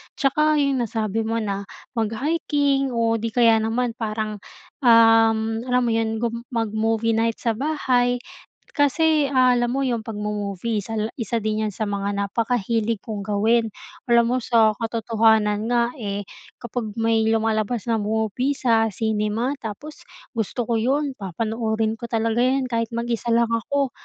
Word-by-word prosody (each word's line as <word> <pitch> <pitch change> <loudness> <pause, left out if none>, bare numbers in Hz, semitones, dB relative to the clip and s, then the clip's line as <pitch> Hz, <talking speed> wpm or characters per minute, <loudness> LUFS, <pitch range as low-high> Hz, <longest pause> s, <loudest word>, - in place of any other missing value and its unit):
Tsaka 305 +2 +2
'yung 275 -1 +1
nasabi 220 0 -2
mo 225 - -1
na 200 -1 -3 0.3
mag-hiking 275 +3 0
o 230 -1 +2
di 225 0 -4
kaya 230 -2 +5
naman 230 +2 0
parang, 215 -1 -3 0.5
um, 225 -1 +6 0.3
alam 250 0 +2
mo 240 - +1
'yun, 225 0 -1
gum 235 0 -3
mag-movie 225 0 0
night 225 0 0
sa 230 -2 0
bahay. 250 -4 +1 0.5
Kasi 300 +1 +3
alam 250 -2 +3
mo, 270 +3 -1
'yung 245 -3 0
'pagmo-movie 210 0 -3
isa 225 +3 -6
la 215 +1 -2
isa 230 0 -1
din 215 0 0
yan 205 - -6
sa 220 - -2
mga 200 -1 -2
napakahilig 225 +1 -1
kong 215 -3 -5
gawin. 220 +3 +1 0.4
Alam 235 -1 +5
mo 255 - +2
sa 230 -3 +3
katotohanan 220 -2 +1
nga 240 0 +1
eh, 205 -2 -3 0.3
kapag 235 -3 -5
may 225 -1 +1
lumalabas 225 0 0
na 225 - +1
movie 220 +6 -1
sa 225 -4 +2
cinema 220 +3 -1
tapos 235 +8 -8 0.2
gusto 230 +1 -2
ko 230 0 0
'yun, 275 +5 0
papanoorin 220 +3 -2
ko 235 - -6
talaga 225 0 0
'yun 260 +2 +2
kahit, 230 -2 -1
mag 235 +1 -2
isa 235 0 -3
lang 235 0 +2
ako. 265 +4 0
225 Hz, 150 wpm, -23 LUFS, 220-245 Hz, 0.5 s, um